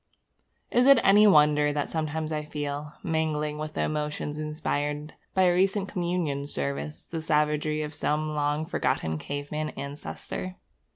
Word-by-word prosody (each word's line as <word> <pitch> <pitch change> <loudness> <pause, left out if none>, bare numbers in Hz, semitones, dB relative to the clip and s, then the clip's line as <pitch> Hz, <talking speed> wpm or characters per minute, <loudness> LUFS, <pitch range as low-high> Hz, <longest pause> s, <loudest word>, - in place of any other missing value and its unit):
Is 245 +2 +4
it 275 -3 +8
any 205 +2 +7
wonder 150 -4 +5
that 145 -1 -1
sometimes 160 0 -2
I 150 0 -2
feel, 150 0 -4
mingling 150 -2 -1
with 155 0 -5
the - - 0
emotions 150 0 -2
inspired 150 -1 -2 0.2
by 190 - +5
a 180 -1 +5
recent 195 +2 +2
communion 170 -6 -1
service, 70 - -4
the 165 -1 -5
savagery 150 0 +1
of 150 0 -5
some 155 +1 -1
long 150 +1 0
forgotten 80 - -1
caveman 145 - -3
ancestor? 145 +6 -5
150 Hz, 140 wpm, -27 LUFS, 145-160 Hz, 0.2 s, it